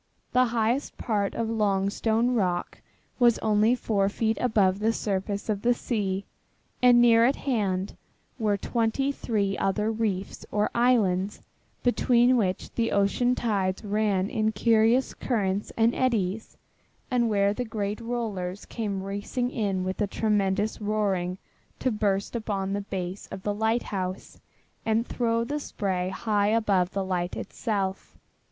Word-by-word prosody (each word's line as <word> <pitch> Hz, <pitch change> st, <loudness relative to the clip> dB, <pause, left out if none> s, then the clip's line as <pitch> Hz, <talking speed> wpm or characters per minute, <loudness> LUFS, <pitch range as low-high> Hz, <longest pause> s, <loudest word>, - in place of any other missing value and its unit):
The 255 Hz, 0 st, +4 dB
highest 235 Hz, +3 st, -1 dB
part 205 Hz, -4 st, -1 dB
of 230 Hz, -, -1 dB
Longstone 220 Hz, +2 st, +1 dB
Rock 180 Hz, -6 st, -1 dB, 0.4 s
was 240 Hz, -2 st, +5 dB
only 215 Hz, +2 st, +3 dB
four 200 Hz, -5 st, 0 dB
feet 220 Hz, +2 st, 0 dB
above 200 Hz, -6 st, +2 dB
the 220 Hz, +2 st, +2 dB
surface 200 Hz, -1 st, -2 dB
of 210 Hz, -2 st, -1 dB
the 240 Hz, +2 st, +3 dB
sea, 200 Hz, -5 st, -2 dB, 0.6 s
and 245 Hz, -1 st, +7 dB
near 230 Hz, -1 st, +6 dB
at 260 Hz, +4 st, +4 dB
hand 200 Hz, -7 st, -1 dB, 0.4 s
were 210 Hz, -2 st, +1 dB
twenty 235 Hz, +6 st, 0 dB
three 205 Hz, -7 st, -1 dB
other 210 Hz, +3 st, 0 dB
reefs 210 Hz, -4 st, -2 dB
or 210 Hz, 0 st, +1 dB
islands, 210 Hz, -6 st, +2 dB, 0.4 s
between 245 Hz, 0 st, +4 dB
which 190 Hz, -6 st, -1 dB
the 230 Hz, -1 st, 0 dB
ocean 200 Hz, +5 st, +2 dB
tides 195 Hz, -6 st, -1 dB
ran 205 Hz, -2 st, +1 dB
in 220 Hz, +1 st, 0 dB
curious 230 Hz, +3 st, +3 dB
currents 205 Hz, -5 st, -1 dB
and 230 Hz, +1 st, +4 dB
eddys, 220 Hz, -5 st, -1 dB, 0.5 s
and 240 Hz, -2 st, +2 dB
where 200 Hz, -1 st, +2 dB
the 250 Hz, -, -3 dB
great 210 Hz, -2 st, -3 dB
rollers 210 Hz, -6 st, -3 dB
came 200 Hz, -4 st, -3 dB
racing 205 Hz, +6 st, -3 dB
in 195 Hz, -5 st, -1 dB
with 185 Hz, +3 st, -3 dB
a 205 Hz, -, +2 dB
tremendous 210 Hz, 0 st, 0 dB
roaring 195 Hz, -4 st, 0 dB, 0.4 s
to 255 Hz, -, 0 dB
burst 205 Hz, -1 st, -1 dB
upon 200 Hz, -4 st, -2 dB
the 205 Hz, -, -1 dB
base 190 Hz, -1 st, -5 dB
of 190 Hz, -1 st, -8 dB
the 205 Hz, -, 0 dB
lighthouse 205 Hz, -4 st, -2 dB, 0.4 s
and 225 Hz, +1 st, +1 dB
throw 230 Hz, -2 st, 0 dB
the 290 Hz, +5 st, -3 dB
spray 185 Hz, -9 st, -2 dB
high 205 Hz, 0 st, 0 dB
above 205 Hz, -5 st, +2 dB
the 195 Hz, 0 st, -3 dB
light 180 Hz, -1 st, -2 dB
itself. 195 Hz, -4 st, -3 dB
210 Hz, 140 wpm, -26 LUFS, 195-230 Hz, 0.6 s, and